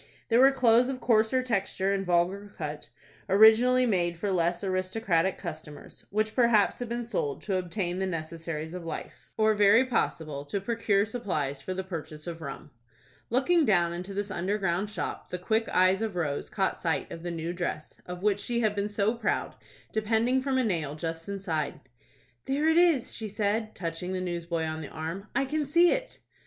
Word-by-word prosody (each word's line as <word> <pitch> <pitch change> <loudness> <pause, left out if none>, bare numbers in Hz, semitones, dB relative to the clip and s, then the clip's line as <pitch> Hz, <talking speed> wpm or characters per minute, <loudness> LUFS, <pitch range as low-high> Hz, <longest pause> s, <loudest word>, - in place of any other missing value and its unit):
There 230 +1 +4
were 265 +1 +8
clothes 250 -2 +4
of 265 -1 -3
coarser 230 +2 +3
texture 195 -4 0
and 195 -1 -1
vulgar 185 +3 0
cut, 150 -1 -5 0.4
originally 225 +5 +6
made 175 -6 0
for 200 +3 -2
less 175 0 +1
aristocratic 185 -1 0
customers, 150 -4 -9
which 215 +2 0
perhaps 235 -5 +3
had 245 -2 -4
been 240 +1 -2
sold 145 -11 -3
to 195 -3 0
obtain 180 0 -2
the 190 - 0
necessaries 160 -1 -4
of 180 -1 -6
life, 165 - -7
or 220 0 +4
very 210 +4 +5
possibly 160 - -1
to 200 - -2
procure 205 -1 +1
supplies 155 - -3
for 185 +6 -4
the 190 - -3
purchase 155 -4 -7
of 170 -1 -6
rum. 140 0 -7 0.6
Looking 310 +8 +3
down 175 - +3
into 180 +3 -6
this 205 0 -2
under 190 +3 -1
ground 195 0 -1
shop, 210 - -5
the 180 - -3
quick 220 +5 0
eyes 185 +2 +3
of 220 -4 -2
Rose 150 -5 -2
caught 190 -2 -1
sight 165 -2 -1
of 165 - -7
the 175 - -4
new 165 0 -3
dress, 170 -3 -4
of 180 +1 -7
which 205 -1 +2
she 235 +2 -1
had 215 -2 +2
been 205 0 -2
so 210 +1 +1
proud, 230 -2 -1 0.4
depending 225 +4 +1
from 265 0 0
a 260 - +2
nail 160 - -1
just 165 +2 -5
inside. 185 -7 -3 0.7
"There 285 +3 +1
it 320 +1 +4
is," 340 -8 +3
she 220 - -5
said, 215 +2 -1
touching 170 +1 -4
the 185 - -1
newsboy 170 -2 -2
on 160 0 -3
the 150 - -7
arm. 165 +6 -5
"I 275 - +2
can 300 +3 -1
see 340 +5 +4
it." - - -2
195 Hz, 190 wpm, -28 LUFS, 170-225 Hz, 0.7 s, were